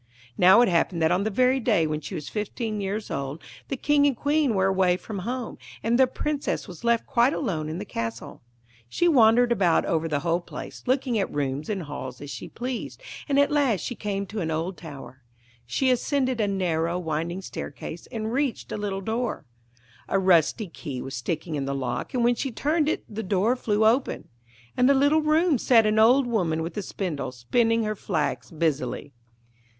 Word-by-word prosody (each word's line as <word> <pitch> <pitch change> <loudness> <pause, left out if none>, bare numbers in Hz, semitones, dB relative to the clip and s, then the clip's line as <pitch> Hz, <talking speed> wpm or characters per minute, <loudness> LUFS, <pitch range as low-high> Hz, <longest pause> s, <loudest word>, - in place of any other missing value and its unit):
Now 185 - +7
it 245 - +5
happened 170 0 +1
that 160 - +3
on 185 +3 +1
the - - +1
very 255 +5 +3
day 210 -9 +2
when 155 0 -2
she 145 - -6
was 150 - -6
fifteen 215 0 -3
years 200 +2 -3
old 140 +2 -3 0.3
the 270 - -3
King 290 +1 +3
and 270 -4 0
Queen 290 -4 +1
were 190 0 +2
away 190 -2 +3
from 200 +1 -6
home, 240 +5 -4 0.2
and 235 +2 +2
the 260 - +6
Princess 290 +1 -2
was 180 +2 -11
left 235 -1 +2
quite 240 +4 +3
alone 160 - -2
in 160 - -4
the 205 - -5
castle. 115 - -5 0.5
She 345 - +1
wandered 240 -5 +5
about 185 -8 +3
over 165 0 0
the 145 -2 -1
whole 170 +1 0
place, - - -9
looking 255 -3 +1
at 195 - -1
rooms 140 +2 -2
and 195 -4 -2
halls 130 -4 -7
as 145 0 -8
she - - -7
pleased, 250 0 -5 0.3
and 280 - +2
at 285 +1 +4
last 270 - +2
she - - -3
came 200 -3 -3
to 210 +3 -6
an 160 - -2
old 165 +4 -2
tower. 140 -6 -10 0.5
She 260 - +1
ascended 255 -1 0
a 210 - +2
narrow, 175 -3 0
winding 170 +2 -3
staircase 155 +1 -7
and 220 0 -3
reached 275 -2 -1
a - - -2
little 200 -2 -3
door. 225 +4 -2 0.6
A - - +2
rusty 185 +3 +3
key 145 -5 -7
was 135 +1 -6
sticking 155 +7 -3
in 140 -2 -2
the 140 0 -2
lock, 125 - -3
and 245 - +2
when 240 +1 +4
she 270 +3 -3
turned 300 +6 +1
it - - -1
the 220 0 -5
door 205 +4 +1
flew 215 -3 +1
open. 240 +5 +1 0.5
In 250 +1 +4
a 280 - +5
little 285 +3 +4
room 310 -1 +3
sat 230 -2 +5
an 215 0 +2
old 250 +5 +6
woman 175 -9 0
with 165 +1 -5
a 205 - -2
spindle, 175 -8 -4
spinning 225 - +1
her 215 0 -1
flax 185 -4 -2
busily. 150 -4 -2
205 Hz, 200 wpm, -25 LUFS, 160-245 Hz, 0.6 s, Now